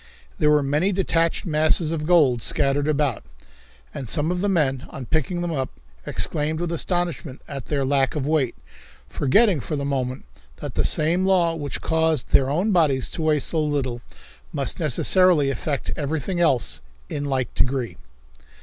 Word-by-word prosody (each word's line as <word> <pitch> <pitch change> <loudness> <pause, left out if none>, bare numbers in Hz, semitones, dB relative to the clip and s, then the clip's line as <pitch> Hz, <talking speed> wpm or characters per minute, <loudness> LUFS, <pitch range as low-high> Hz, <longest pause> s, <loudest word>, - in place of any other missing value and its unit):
There 150 - +3
were 150 -1 +4
many 150 +8 +1
detached 170 -3 0
masses 155 0 +2
of 155 -2 -3
gold 145 -9 +4
scattered 140 +4 +1
about, 145 -6 0 0.7
and 130 - -6
some 155 +3 +1
of 180 0 -2
the 205 - +1
men, 140 -8 +1
on 135 - -8
picking 160 +5 -1
them 175 -1 -2
up, 135 -4 -2 0.4
exclaimed 155 +1 0
with 175 -1 -2
astonishment 170 -4 -2
at 135 -3 -6
their 140 -3 -1
lack 135 0 +1
of 145 -3 -2
weight, 145 -5 0 0.5
forgetting 185 - +2
for 150 - -4
the 140 -1 -3
moment 130 - -3 0.3
that - - -7
the - - 0
same 165 +4 +1
law 180 -3 +3
which 145 -3 -5
caused 160 -4 0
their 135 -1 +4
own 180 +9 0
bodies 150 -8 +2
to - - -4
weigh 155 -1 +2
so 155 +2 +1
little 135 -5 -2 0.5
must - - -3
necessarily 175 -7 +3
affect 140 -1 -3
everything 160 +4 -3
else 140 -8 +1 0.3
in 145 -1 -4
like 130 -3 -2
degree. 125 -7 -1
150 Hz, 165 wpm, -23 LUFS, 135-170 Hz, 0.7 s, were